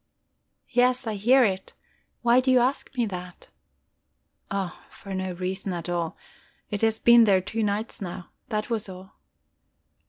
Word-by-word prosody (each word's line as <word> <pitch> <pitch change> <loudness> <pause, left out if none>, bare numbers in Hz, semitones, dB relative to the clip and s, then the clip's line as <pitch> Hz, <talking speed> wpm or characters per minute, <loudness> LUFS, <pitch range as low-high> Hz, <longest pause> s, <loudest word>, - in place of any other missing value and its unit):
"Yes, 250 +1 +3
I 220 - -2
hear 245 +6 +4
it. 190 -4 -1 0.5
Why 240 +1 +5
do 260 +1 0
you 255 - +6
ask 250 +3 +1
me 240 - +2
that?" 180 -3 -8 1.0
"Oh, 195 -3 -3
for 195 - -9
no 185 -1 -3
reason 185 +2 -3
at 170 0 -5
all. 170 -2 -2 0.5
It 205 - -2
has 225 -1 +2
been 235 0 +7
there 195 -3 +4
two 215 +5 -3
nights 210 +1 -2
now. 180 -1 -7 0.2
That 215 +2 -2
was 215 -3 -2
all... 185 +1 -12
205 Hz, 155 wpm, -26 LUFS, 185-235 Hz, 1.0 s, been